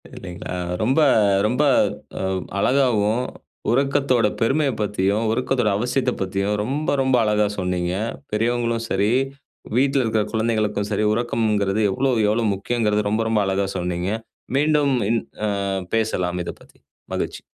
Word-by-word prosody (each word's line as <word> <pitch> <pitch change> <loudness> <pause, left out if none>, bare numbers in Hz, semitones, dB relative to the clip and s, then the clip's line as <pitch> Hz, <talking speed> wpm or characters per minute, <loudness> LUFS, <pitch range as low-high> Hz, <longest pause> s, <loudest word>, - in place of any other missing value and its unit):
இல்லீங்களா? 90 +1 -7 0.3
ரொம்ப 130 +7 +2 0.5
ரொம்ப 125 +6 +1 0.6
உ - - -3 0.4
அழகாவும் 125 -2 +2 0.5
உறக்கத்தோட 135 -3 +2
பெருமைய 135 +4 +2
பத்தியும், 105 +1 0
உறக்கத்தோட 125 -1 +1
அவசியத்தப் 125 +3 -1
பத்தியும் 100 +2 -1
ரொம்ப 140 +7 -2
ரொம்ப 130 -1 +2
அழகா 105 -1 +2
சொன்னீங்க. 90 -1 -1 0.4
பெரியவங்களும் 115 +1 0
சரி, 100 +3 +1 0.7
வீட்ல 135 0 +3
இருக்குற 110 -2 +1
குழந்தைகளுக்கும் 110 -2 0
சரி 105 +1 +1
உறக்கம்ங்குறது 110 -3 0
எவ்ளோ 130 +7 +1 0.2
எவ்ளோ 110 +2 +1
முக்கியம்ங்குறது 105 0 0
ரொம்ப 110 +2 +1
ரொம்ப 110 -2 +2
அழகா 95 0 0
சொன்னீங்க. 90 +1 -2 0.5
மீண்டும் 150 -2 +3 0.2
இன் 115 0 +2 0.3
அ - - 0 0.5
பேசலாம் 90 -5 0
இத - - -3
பத்தி. - - -20 0.3
மகிழ்ச்சி! - - -3
110 Hz, 125 wpm, -22 LUFS, 100-125 Hz, 0.7 s, வீட்ல